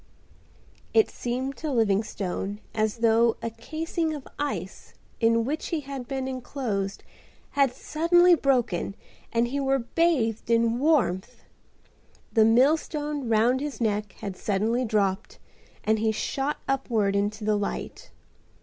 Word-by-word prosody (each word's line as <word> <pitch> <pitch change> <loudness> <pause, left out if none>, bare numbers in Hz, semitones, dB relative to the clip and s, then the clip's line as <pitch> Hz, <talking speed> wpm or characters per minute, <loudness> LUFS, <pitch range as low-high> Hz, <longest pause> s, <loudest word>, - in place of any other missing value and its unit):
It 440 - +5
seemed 260 +3 -3
to 310 -2 -3
Livingstone 205 -3 -1
as 215 0 0
though 230 +1 +4
a 230 0 -4
casing 315 +7 -3
of 285 - -9
ice 290 0 -4 0.2
in 230 0 +3
which 300 +5 -2
he 325 -3 -2
had 270 -3 -7
been 265 0 -3
enclosed 240 -6 -3 0.5
had 275 -3 +3
suddenly 345 +3 +4
broken 245 - +1 0.4
and 235 +1 +1
he 280 +3 -2
were 270 0 +2
bathed 245 -4 0
in 230 0 +3
warmth. 260 - +1 0.9
The 220 -2 +5
millstone 290 +3 +2
round 230 +4 +3
his 295 -1 -4
neck 210 -3 -1
had 195 -2 -6
suddenly 220 +6 0
dropped 205 -3 0 0.5
and 220 0 +2
he 220 0 +2
shot 270 +6 -2
upward 230 -7 +1
into 205 +2 -1
the 210 0 +2
light. 205 -1 -4
235 Hz, 130 wpm, -26 LUFS, 215-280 Hz, 0.9 s, It